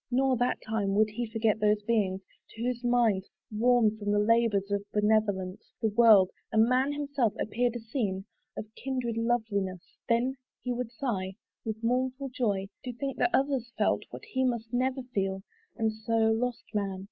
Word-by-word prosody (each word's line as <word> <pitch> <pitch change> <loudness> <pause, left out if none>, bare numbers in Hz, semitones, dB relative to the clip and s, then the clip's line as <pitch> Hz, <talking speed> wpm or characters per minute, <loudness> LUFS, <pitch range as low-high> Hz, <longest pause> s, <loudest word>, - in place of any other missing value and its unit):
Nor, 260 +1 +2
that 245 +1 +1
time, 205 -3 0
Would 215 +1 +3
he 235 +2 -3
forget 220 -1 +1
those 210 0 +2
beings, 205 -4 +1 0.3
to 225 - -7
whose 245 0 -2
minds, 235 -6 +2 0.2
Warm 225 0 +3
from 205 -1 -3
the 205 - +3
labours 210 -2 +2
of 200 0 0
benevolence, 210 -3 0
The 225 - +1
world, 210 -4 +6 0.2
and 220 0 +5
man 260 +3 +2
himself, 285 -6 0
appeared 240 +2 0
a - - -3
scene 220 -5 -2 0.3
Of - - -4
kindred 255 -3 -3
loveliness: 220 -6 -1 0.3
then 245 +3 +2 0.3
he 250 - -1
would 240 -1 -4
sigh 200 -7 -3 0.3
With 220 0 -5
mournful 255 +3 0
joy, 205 -6 -1
to 250 - -4
think 270 +2 -4
that - - +3
others 270 -6 +1
felt - - +2
What - - -9
he 260 0 -1
must 235 -3 -1
never 260 +1 0
feel: 195 -2 -1 0.3
and 220 -1 +1
so, 220 +1 -3 0.2
lost 240 +2 -1
man! 200 -2 -1
225 Hz, 170 wpm, -29 LUFS, 210-245 Hz, 0.3 s, world